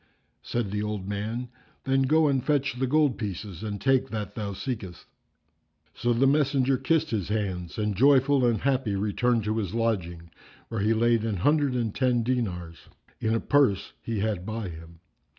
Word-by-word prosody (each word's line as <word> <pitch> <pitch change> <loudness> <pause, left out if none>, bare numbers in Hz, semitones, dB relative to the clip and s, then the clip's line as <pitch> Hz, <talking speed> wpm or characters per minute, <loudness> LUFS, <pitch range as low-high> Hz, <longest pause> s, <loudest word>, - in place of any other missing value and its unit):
Said 120 -5 -3
the 105 0 -1
old 105 -2 -3
man, 110 +5 -3 0.3
"Then 135 0 +2
go 155 +4 +4
and 135 -3 +1
fetch 140 -2 +1
the 130 - +1
gold 145 -4 +2
pieces, 100 -4 -5
and 105 -2 -4
take 135 +4 +2
that 105 -2 -4
thou 105 -2 -4
seekest." 100 -5 -6 0.9
So 120 - -1
the 120 +3 +3
messenger 135 -2 +3
kissed 145 +5 +1
his 105 -6 -1
hands 95 -5 -3
and 105 -2 -1
joyful 135 +3 +4
and 115 -4 +2
happy 130 -6 0
returned 110 +4 +1
to 110 +2 -1
his 100 -2 -2
lodging, 85 -8 -2 0.4
where 115 -3 -2
he 110 +2 +2
laid 115 0 +2
an 110 -3 -1
hundred 145 - +2
and 115 -4 -1
ten 125 -3 +1
dinars[FN#351] 95 -9 -2 0.4
in 110 0 0
a - - +1
purse 135 -10 +2
he 110 -3 -3
had 105 -4 -1
by 110 -1 -4
him. 80 0 -12
115 Hz, 175 wpm, -27 LUFS, 100-130 Hz, 0.9 s, go